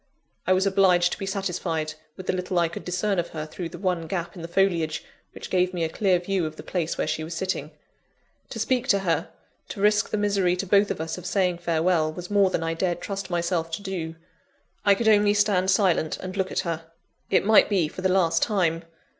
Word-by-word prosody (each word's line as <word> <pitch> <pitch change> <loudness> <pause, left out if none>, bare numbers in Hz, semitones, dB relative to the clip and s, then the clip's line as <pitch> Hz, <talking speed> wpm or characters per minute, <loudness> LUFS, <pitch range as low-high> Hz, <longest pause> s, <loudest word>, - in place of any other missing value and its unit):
I 185 - +5
was 185 +1 +2
obliged 185 -3 +4
to - - -4
be 195 - -4
satisfied 175 -5 -2 0.2
with 185 - -8
the - - 0
little 180 0 -2
I 170 -1 +3
could 170 - -7
discern 185 +2 0
of 170 - -2
her, 155 -1 -5
through 165 +2 -6
the 175 - -9
one 175 -3 -1
gap 170 0 -4
in 175 - -8
the 165 - -5
foliage 170 -3 +1 0.3
which - - -9
gave 185 0 +1
me 170 - -1
a 160 - 0
clear 185 +1 +2
view 180 -1 -1
of 155 - -8
the - - -10
place 170 -3 -2
where - - 0
she 155 - -2
was 165 +1 -6
sitting. 165 -4 -2 0.8
To - - -7
speak 255 -1 0
to 200 -6 +4
her, 170 -3 0 0.4
to - - -7
risk 210 +1 +3
the - - -1
misery 200 -3 +2
to 180 - -3
both 200 +2 +4
of - - -3
us 160 +2 -4
of 180 - -7
saying 180 -3 +1
farewell, 165 -1 +1
was 180 +4 -8
more 200 -2 +4
than 165 - -1
I 165 0 -1
dared 175 +1 -1
trust 195 -1 -5
myself 170 -1 -1
to 200 - -3
do. 170 -5 -4 0.7
I 200 -1 +5
could 225 +2 -1
only 205 -1 +5
stand 200 -3 +2
silent, 185 -5 +2
and 185 +1 -7
look 190 -1 -1
at - - 0
her 165 -1 -4 0.4
it - - +3
might 220 +1 +6
be 185 -6 +2
for 170 - -8
the 190 - +2
last 170 -3 +2
time! 175 -6 +1
180 Hz, 230 wpm, -25 LUFS, 165-195 Hz, 0.8 s, might